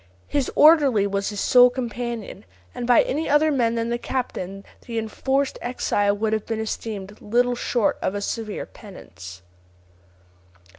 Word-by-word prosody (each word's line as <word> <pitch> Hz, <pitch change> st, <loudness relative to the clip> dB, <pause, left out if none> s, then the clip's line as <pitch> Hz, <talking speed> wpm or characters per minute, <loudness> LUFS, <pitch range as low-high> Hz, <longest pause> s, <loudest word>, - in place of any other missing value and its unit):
His 280 Hz, -3 st, -1 dB
orderly 285 Hz, -9 st, +5 dB
was 200 Hz, 0 st, -1 dB
his 205 Hz, -1 st, -5 dB
sole 250 Hz, +3 st, +6 dB
companion, 240 Hz, -4 st, -5 dB, 0.3 s
and 245 Hz, -1 st, -5 dB
by 245 Hz, -, +6 dB
any 300 Hz, +4 st, -2 dB
other 300 Hz, +2 st, +4 dB
man 235 Hz, -4 st, +1 dB
than 230 Hz, 0 st, -1 dB
the 240 Hz, 0 st, -1 dB
captain 195 Hz, -7 st, -4 dB, 0.2 s
the 230 Hz, -1 st, -4 dB
enforced 265 Hz, +5 st, -1 dB
exile 205 Hz, -4 st, 0 dB
would 220 Hz, +1 st, -1 dB
have 215 Hz, -1 st, -2 dB
been 225 Hz, -1 st, -2 dB
esteemed 210 Hz, -2 st, -5 dB
little 245 Hz, +3 st, +1 dB
short 240 Hz, -2 st, 0 dB
of 195 Hz, -, -1 dB
a 205 Hz, -, -3 dB
severe 215 Hz, 0 st, -4 dB
penance. 90 Hz, -, -12 dB
230 Hz, 150 wpm, -23 LUFS, 205-250 Hz, 0.3 s, sole